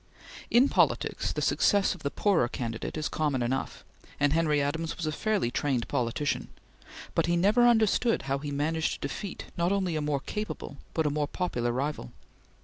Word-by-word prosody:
In 250 +4 +5
politics - - +1
the - - -2
success 200 -1 +3
of - - -12
the 140 - -1
poorer 190 - +2
candidate 120 +1 -4
is 155 - -1
common 145 -5 0
enough, 130 +3 -3 0.3
and 145 0 +3
Henry 155 -2 +2
Adams 160 +4 -2
was 175 - -3
a 155 - 0
fairly 205 - 0
trained 130 -3 0
politician, 135 +2 -1 0.7
but - - +1
he 175 0 +2
never 215 +7 +5
understood 230 0 +3
how 135 0 -1
he 145 +1 -5
managed 155 +3 0
to - - -4
defeat 195 +7 -6
not 170 +2 +1
only 190 -4 0
a 155 - 0
more 145 -2 -1
capable 210 -7 -5 0.2
but 160 - +1
a 150 - +2
more 150 0 0
popular 125 -10 -1
rival. 130 - -3
150 Hz, 180 wpm, -28 LUFS, 140-180 Hz, 0.7 s, In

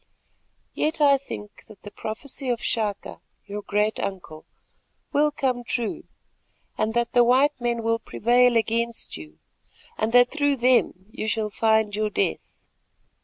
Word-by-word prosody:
Yet 315 +2 -1
I 280 -2 +5
think 210 -6 -9
that 210 - -16
the 205 - -9
prophecy 255 +6 -6
of 240 -2 0
Chaka, 215 -5 -2 0.2
your 205 0 -6
great 210 +1 0
uncle, 175 -5 -6 0.7
will 300 +1 +3
come 260 -4 -2
true, 235 -2 -3 0.7
and 220 +1 -1
that 235 -1 +1
the 245 -1 +6
white 260 +3 +3
men 235 -1 -1
will 230 0 +1
prevail 245 +2 +2
against 230 +1 -1
you 75 -1 -11 0.6
and 220 +1 0
that 245 0 +6
through 285 -2 +1
them 245 -7 +2
you 215 - -5
shall 215 -1 -1
find 220 -1 +2
your 215 0 0
death. 80 - -3
230 Hz, 145 wpm, -24 LUFS, 210-250 Hz, 0.7 s, the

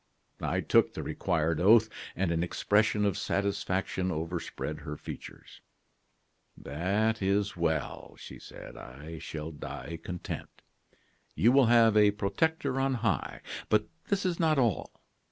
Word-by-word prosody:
"I - - 0
took - - +3
the - - -4
required 80 -3 0
oath, 110 +3 +7 0.3
and 95 -2 0
an 85 -1 +1
expression 105 +4 +2
of 100 -3 0
satisfaction 95 -1 -1
overspread 80 -2 -4
her 75 0 -6
features. - - -10 1.0
"'That 100 +10 0
is 100 +1 +1
well,' 85 -2 -2
she - - -10
said; - - -11
'I 75 +6 -9
shall 75 +2 -6
die 80 +1 -7
content. 90 -1 -6 0.7
You 115 - +5
will 135 -2 +5
have 115 -2 +6
a 105 -1 +7
protector 130 +8 0
on 135 0 +1
high. 95 -10 -1 0.3
But 105 0 +2 0.2
this 200 -1 0
is 175 -2 0
not 160 -3 +3
all. 120 -8 +1
100 Hz, 135 wpm, -30 LUFS, 85-110 Hz, 1.0 s, oath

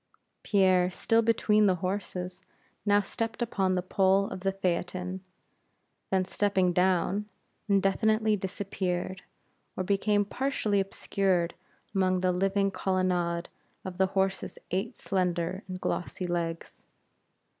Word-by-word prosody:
Pierre, 185 -3 +3
still 225 +5 +2
between 215 -2 +3
the 185 - +3
horses, 185 -1 -4 0.5
now 205 0 +5
stepped 225 +3 -4
upon 195 -5 0
the 180 -1 0
pole 195 +1 +3
of - - -5
the 195 +1 0
phaeton; 185 0 -2 0.9
then 190 -1 +2
stepping 190 -2 +1
down, 190 +3 +1 0.4
indefinitely 215 +2 +3
disappeared, 185 -1 -3 0.6
or 185 - 0
became 205 +2 +2
partially 220 -3 0
obscured 190 -2 0 0.4
among 185 -2 +2
the 185 0 +3
living 195 +2 +1
colonnade 180 -2 0 0.4
of 185 -1 -6
the 190 - +4
horses' 190 0 -1
eight 195 +6 -2
slender 180 -1 -1
and 185 -1 -5
glossy 180 0 -3
legs. 170 -1 -3
190 Hz, 115 wpm, -29 LUFS, 180-200 Hz, 0.9 s, now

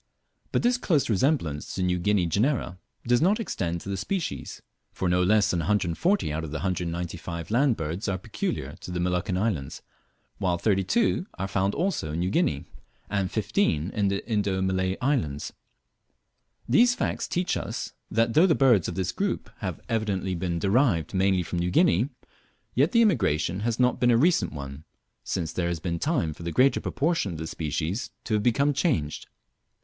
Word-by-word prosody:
But - - +1
this 245 +1 +3
close 150 - +1
resemblance 100 - 0
to 95 - -1
New 90 0 +1
Guinea 100 0 +2
genera 100 - 0 0.3
does 120 +2 +3
not 200 +7 +3
extend 85 - -2
to - - -8
the 100 - -1
species, 175 - -3 0.3
for 95 - -2
no 90 +1 +2
less 105 +3 +3
than 85 - 0
140 100 - +1
out 80 +1 -2
of 80 - -5
the 80 - -6
195 85 -1 -3
land 125 +1 +3
birds 80 +6 -3
are 95 - 0
peculiar 75 -5 -4
to - - -9
the 90 0 -3
Moluccan 90 +1 0
islands, 95 -10 -2 0.6
while 90 -3 +1
32 110 - +1
are 95 - -3
found 100 +1 0
also 165 - -1
in 80 - -2
New 90 +2 0
Guinea, - - +1 0.5
and 100 -2 0
15 100 - 0
in 105 -2 0
the 100 +1 -2
Indo 100 -4 0
Malay 95 0 0
islands. 120 - -1 1.1
These 240 - +5
facts - - -2
teach 180 +1 0
us, - - -4 0.2
that 115 +1 +1
though 165 +8 +6
the 160 - +3
birds 120 -10 +4
of 85 - -4
this 95 -1 -1
group 200 -1 -2
have 95 -5 -4
evidently 100 -4 -1
been 85 -1 -2
derived 100 - +2
mainly 95 -1 +2
from 85 +1 -3
New 90 +1 0
Guinea, 95 +6 +3 0.6
yet - - +3
the 235 -2 +5
immigration 95 - +1
has 115 +2 -1
not 125 0 +3
been 120 0 +3
a 115 - +5
recent 140 - +3
one, 70 0 -7 0.4
since 85 -2 -3
there 90 -2 -1
has 85 -1 -2
been 85 0 -3
time 135 - 0
for 75 - -14
the 85 0 -3
greater 130 - +3
portion 150 - 0
of - - -6
the 80 - -5
species 80 - -3
to 110 - -3
have 105 - +2
become 140 +6 +2
changed. 125 - -1
95 Hz, 180 wpm, -26 LUFS, 85-125 Hz, 1.1 s, though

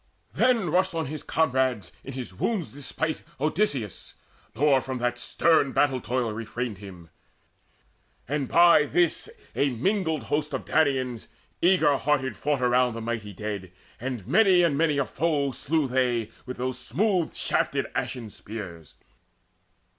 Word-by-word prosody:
Then 230 -10 +2
Rushed 185 +1 +2
on 160 -1 -1
his 150 +2 -5
comrades, 130 - 0
in 135 - -7
his 125 -6 -6
wound's 180 - -2
despite, 145 +3 -3 0.2
Odysseus, 145 - -1 0.4
nor 135 +1 +4
from 130 0 -4
that 120 0 -1
stern 150 -1 +2
battle 135 -3 +2
toil 120 0 -1
Refrained 115 -1 -4
him. 90 -5 -11 1.2
And 140 0 -1
by 170 -2 +6
this 175 - +1 0.3
a 140 - +2
mingled 160 - 0
host 150 +5 -1
Of - - -5
Danaans 130 -6 +1 0.3
eager 165 -6 +4
hearted 135 -2 0
fought 145 -3 -1
around 125 -1 +3
The 115 - -5
mighty 110 -2 -4
dead, 100 -2 -5 0.3
and 125 -5 -4
many 190 - +5
and 165 -5 +2
many 150 -1 +2
a 140 - +2
foe 145 -2 0
Slew 150 +3 0
they 125 -3 0 0.2
with 125 - -5
those 130 +1 -3
smooth 190 -5 0
shafted - - 0
ashen 115 -5 -3
spears. 90 -9 -9
135 Hz, 140 wpm, -26 LUFS, 120-160 Hz, 1.2 s, by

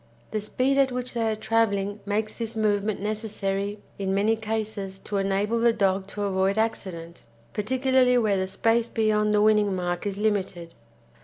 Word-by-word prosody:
The 215 - -1
speed 260 +6 +1
at 270 -1 +3
which 250 0 -3
they 225 -2 0
are - - -1
travelling 210 -2 0
makes 215 +1 -1
this 230 -1 -5
movement 210 -1 0
necessary 205 -1 -2 0.2
in 195 -1 -1
many 210 +3 +3
cases 215 -3 -4
to 200 +1 -4
enable 200 +4 0
the 235 0 +4
dog 195 -3 +1
to 205 +1 -5
avoid 195 0 +1
accident, 175 -6 -3 0.3
particularly 255 +3 +2
where 215 -4 +2
the 190 0 -1
space 225 +4 +1
beyond 215 -1 +1
the 210 0 +3
winning 210 -2 +3
mark 175 +1 -2
is 200 -1 -3
limited. 195 -5 -1
210 Hz, 165 wpm, -25 LUFS, 195-225 Hz, 0.3 s, the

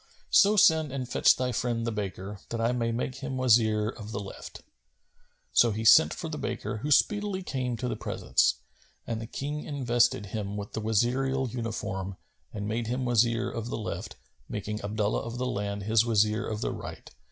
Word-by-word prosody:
So 205 +1 +6
send 160 -8 +5
and 130 -2 -4
fetch - - +4
thy 125 0 -1
friend 120 -1 -1
the 115 - -1
baker, 100 -1 -5
that 115 - -3
I 115 +1 +2
may 115 -2 0
make 125 +2 -3
him 135 0 -5
my 130 - -2
Wazir 110 -3 +4
of 110 -2 -7
the 100 - -3
left."[FN#254] 100 -1 -9 0.9
So 120 - +5
he 110 +1 -3
sent - - +8
for - - -5
the - - -5
baker - - -3
who 145 +8 -4
speedily 205 +4 +2
came 125 -7 -2
to 125 - -3
the - - -2
presence, - - +1 0.5
and 115 -1 -3
the 115 - -6
King 145 +5 -4
invested 120 -6 +1
him 100 0 -4
with 100 0 -6
the 110 - -3
Wazirial 125 +4 +1
uniform 100 -5 -4 0.3
and 105 -1 -4
made 115 +1 -2
him 125 +2 -1
Wazir 120 0 +2
of 115 0 -4
the - - -3
left, 105 - -5 0.3
making 105 +1 -4
Abdullah 105 0 -1
of 115 +1 -6
the 125 - -1
Land 100 -3 -3
his 110 +2 +3
Wazir 110 -2 +2
of 110 -1 -4
the - - -1
right. - - -8
115 Hz, 195 wpm, -28 LUFS, 105-125 Hz, 0.9 s, sent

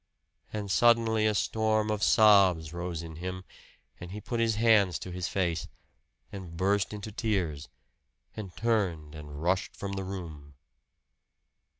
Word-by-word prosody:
And 105 -2 -4
suddenly 115 -1 +4
a 105 - +1
storm 110 +1 +1
of 105 -1 -2
sobs 95 -8 +5
rose 85 -1 -4
in 80 -1 -9
him; 90 +2 -5 0.6
and 85 - -8
he 100 +3 -6
put 120 +2 -4
his 115 -1 +2
hands 105 -5 +4
to 90 - -8
his 90 0 -3
face, 85 -5 -1 0.6
and 90 -4 -8
burst 100 +2 +1
into 105 0 -7
tears, 95 -10 -2 0.7
and 105 -4 -6
turned 95 -10 0
and 75 -1 -9
rushed 95 +4 0
from 100 - -5
the 95 0 -3
room. 80 -7 -8
95 Hz, 140 wpm, -29 LUFS, 85-110 Hz, 0.7 s, sobs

